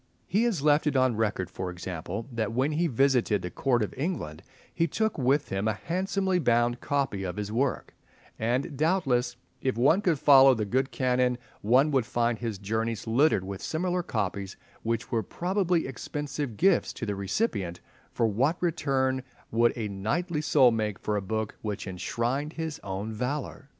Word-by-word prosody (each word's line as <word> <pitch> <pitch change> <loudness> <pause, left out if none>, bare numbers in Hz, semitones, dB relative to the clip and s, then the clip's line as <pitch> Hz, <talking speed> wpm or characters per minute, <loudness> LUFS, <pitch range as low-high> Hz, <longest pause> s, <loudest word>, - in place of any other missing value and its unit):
He 215 +5 +1
has 195 -12 0
left 150 0 +4
it 145 - +1
on 130 -2 +3
record, 105 -4 0
for 95 - -4
example, 90 +3 -5
that 110 -3 -2
when 130 +5 +1
he 165 +3 +1
visited 125 - +2
the 90 - -4
Court 120 0 +1
of 105 - -4
England 130 - -3 0.3
he 165 0 +1
took 220 +7 0
with 140 +3 +2
him 95 +2 -1
a 110 - +2
handsomely 190 - -1
bound 120 -4 +2
copy 135 -8 -1
of 90 0 -4
his 105 0 -3
work; 130 +4 -1 0.5
and, 125 +7 -1
doubtless, 135 -6 +1 0.3
if 130 -3 -1
one 145 +11 +4
could 175 -6 +2
follow 135 -2 +7
the 110 -2 -1
good 130 +6 0
Canon 125 -1 +1 0.2
one 130 +8 +4
would 130 -5 +1
find 120 -2 0
his 115 -4 -3
journeys 110 +2 -2
littered 120 -2 +3
with 95 0 -6
similar 180 +2 -1
copies 100 - -3 0.2
which 115 0 -2
were 115 - +1
probably 180 - 0
expensive 140 -1 -4
gifts 190 -1 +3
to - - -5
the 105 - -2
recipient, 95 - -2 0.3
for 115 - +1
what 130 - +1
return 135 -6 0 0.3
would 115 +1 +4
a 110 -2 -2
knightly 150 - -2
soul 135 -5 +5
make 105 -3 -1
for 105 - -2
a 105 - 0
book 110 +2 -3
which 105 -1 -4
enshrined 120 - -2
his 160 -2 -4
own 100 +3 -4
valour? 135 +4 -4
125 Hz, 175 wpm, -28 LUFS, 105-150 Hz, 0.5 s, follow